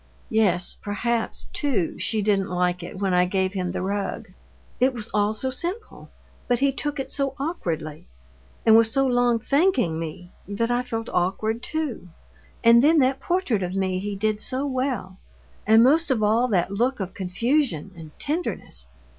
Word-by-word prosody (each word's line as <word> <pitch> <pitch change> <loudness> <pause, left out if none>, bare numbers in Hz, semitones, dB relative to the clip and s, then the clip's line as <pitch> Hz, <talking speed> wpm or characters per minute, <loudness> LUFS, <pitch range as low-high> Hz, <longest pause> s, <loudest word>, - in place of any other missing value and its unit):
'" - - -32
"Yes, 190 -5 +2
perhaps, 225 +3 -2
too, 255 - -1
she 215 -2 0
didn't 195 -2 +1
like 180 0 0
it 175 +2 -8
when 195 -1 0
I 180 0 +4
gave 190 +1 0
him 180 -2 -2
the - - -3
rug. 200 +2 -3 0.5
It 255 +1 +3
was 230 -2 -6
all 210 +1 +1
so 260 +4 -2
simple, 360 - -5 0.4
but 245 - +2
he 275 +2 +2
took 285 +1 -3
it 270 - -3
so 275 -1 -1
awkwardly, 165 - -4 0.6
and 220 - +7
was 225 0 +5
so 270 +2 +2
long 245 -2 +3
thanking 260 - +1
me, 165 +2 -7 0.2
that 230 +4 -1
I 245 0 +2
felt 225 -2 -4
awkward 215 +6 0
too. 295 - -4 0.5
And 235 +1 +7
then 320 +3 +5
that 265 -1 +3
portrait 345 - 0
of 180 +1 -3
me 190 -1 0
he 205 +1 -4
did 215 +1 -1
so 260 +2 -2
well. 255 -8 -2 0.5
And 220 +1 +7
most 315 +6 +4
of 240 -5 +1
all 225 +4 +3
that 190 -5 +1
look 240 +6 0
of 190 -2 -4
confusion 195 - -1
and 160 -2 -10
tenderness! 290 - -3
220 Hz, 175 wpm, -24 LUFS, 190-260 Hz, 0.6 s, and